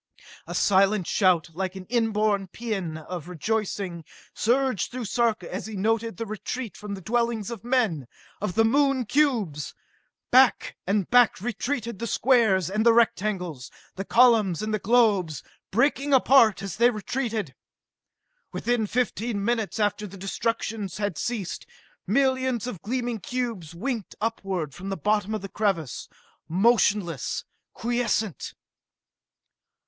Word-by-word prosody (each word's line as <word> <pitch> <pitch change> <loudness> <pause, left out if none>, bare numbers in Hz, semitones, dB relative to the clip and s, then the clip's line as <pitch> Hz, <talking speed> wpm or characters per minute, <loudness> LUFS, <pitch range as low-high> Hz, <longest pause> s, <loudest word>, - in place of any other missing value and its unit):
A - - -5
silent 195 0 +3
shout, 175 -4 +2
like 185 +2 -3
an 190 -1 -8
inborn 215 -3 +1
paean 195 -6 -4
of 170 +1 -7
rejoicing, 190 -1 -2 0.3
surged 255 -3 +1
through 250 -1 -5
Sarka 220 -4 0
as 190 - -4
he 220 - -7
noted 225 +1 0
the 230 - -3
retreat 215 +1 -5
from 205 -1 -6
the 190 - -9
dwellings 235 0 -1
of 230 -3 -7
men, 225 - 0 0.3
of 205 -4 -2
the 225 - +4
Moon 275 +1 +2
cubes! 220 - 0 0.6
Back - - +4
and 195 -1 +1
back 245 -3 +5
retreated 235 0 -3
the 235 - -3
squares 220 - +3
and 210 +4 0
the 235 0 +6
rectangles, 185 - 0 0.3
the 195 - -4
columns 220 -6 +4
and 215 0 -2
the 215 - 0
globes, 200 - +2 0.3
breaking 275 +5 +2
apart 240 -6 +5
as 195 -4 -5
they 235 +2 +5
retreated. 220 - -3 1.0
Within 240 -3 0
fifteen 225 -3 -1
minutes 230 -2 -1
after 210 0 0
the 195 +1 -11
destruction 215 +1 -2
had 205 -4 -2
ceased, 215 -1 -4 0.4
millions 260 +1 +1
of 225 -9 -6
gleaming 240 0 -2
cubes 225 -9 -4
winked 230 +2 -4
upward 195 -9 -2
from 190 +6 -7
the 195 - -3
bottom 210 0 0
of 215 - -5
the - - -4
crevasse 190 - -2 0.4
motionless, 195 - +1 0.3
quiescent! 235 -5 -1
215 Hz, 135 wpm, -25 LUFS, 190-235 Hz, 1.0 s, the